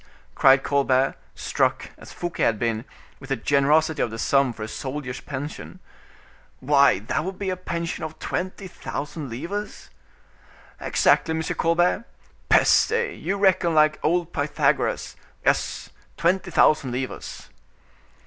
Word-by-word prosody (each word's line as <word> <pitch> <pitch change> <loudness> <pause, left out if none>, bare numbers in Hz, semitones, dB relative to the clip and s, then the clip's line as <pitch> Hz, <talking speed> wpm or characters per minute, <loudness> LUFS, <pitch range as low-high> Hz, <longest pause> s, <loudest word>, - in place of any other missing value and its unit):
cried 135 0 +5
Colbert, 135 -1 +2 0.2
struck, - - -1
as - - -13
Fouquet 175 -1 -5
had 115 - +2
been, 115 +1 -2 0.3
with 135 - -12
the 135 - +1
generosity 145 +5 +2
of - - +1
the 110 - -7
sum 135 +2 +2
for 110 -2 -8
a - - -4
soldier's 130 +2 -5
pension, 145 +2 -7 0.8
"why, 140 -2 +4
that 115 +10 -2
would 190 +2 -5
be 195 -2 -2
a - - -1
pension 170 -2 -4
of 155 0 -6
twenty 185 +2 -4
thousand 150 -4 -6
livres?" 170 - -6 0.9
"Exactly, 160 - +2
M. 160 - -2
Colbert. 175 +7 +1 0.4
Peste! 470 +2 +4
you 200 - -3
reckon 190 -4 +2
like 155 0 +4
old 175 +1 0
Pythagoras; 145 0 0 0.3
yes, - - 0 0.3
twenty 180 +2 +1
thousand 155 -5 +3
livres." 130 +1 -6
155 Hz, 130 wpm, -24 LUFS, 135-175 Hz, 0.9 s, cried